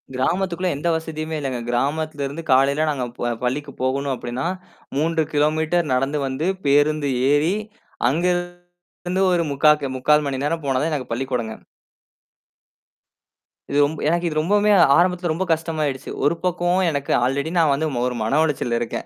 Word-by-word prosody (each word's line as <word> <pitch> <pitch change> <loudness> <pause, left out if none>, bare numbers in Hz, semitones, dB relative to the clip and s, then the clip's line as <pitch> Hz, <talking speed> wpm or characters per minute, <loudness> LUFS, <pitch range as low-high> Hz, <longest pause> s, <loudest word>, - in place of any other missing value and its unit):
கிராமத்துக்குள்ள 180 +6 0
எந்த 170 - -3
வசதியுமே 160 -1 -4
இல்லங்க. 130 -4 -3
கிராமத்தில 145 +3 -1
இருந்து 160 +4 -7
காலையில 140 +4 +3
நாங்க 135 -4 -2 0.2
ப 120 - -1
பள்ளிக்கு 140 +3 -2
போகணும் 135 +1 0
அப்படின்னா, 125 +6 -4 0.5
3 160 +1 +1
கிலோமீட்டர் 155 +2 +1
நடந்து 135 +3 0
வந்து 135 +6 -2 0.2
பேருந்து 145 +1 +3 0.2
ஏறி 155 +7 +2 0.5
அங்க 165 +6 0 0.8
இருந்து 185 +2 0
ஒரு 170 -2 +2
முக்கா 150 +2 +5
கி - - 0
3/4 150 +3 +3
மணி 135 0 -3
நேரம் 165 0 -2
போனா 135 -2 +1
தான் 160 +1 0
எனக்கு 135 -4 -4
பள்ளிக்கூடங்க. 120 -3 -2 2.2
இது 140 - -1
ரொம் 145 +2 +1
எனக்கு 170 +2 +1
இது 155 -1 -3
ரொம்பவுமே 205 +6 +2 0.3
ஆரம்பத்துல 180 -1 +2
ரொம்ப 190 +4 -2
கஷ்டமாயிடுச்சு. 155 -4 -2
ஒரு 150 +4 +3
பக்கமும் 180 0 +1
எனக்கு 140 -2 -3
ஆல்ரெடி 140 +5 -1
நான் 155 -3 +4
வந்து 155 +3 0 0.2
ஒரு 125 - -3
மன 135 +7 +1
உளைச்சல்ல 120 -5 -1
இருக்கேன். 115 - -4
150 Hz, 150 wpm, -22 LUFS, 135-165 Hz, 2.2 s, முக்கா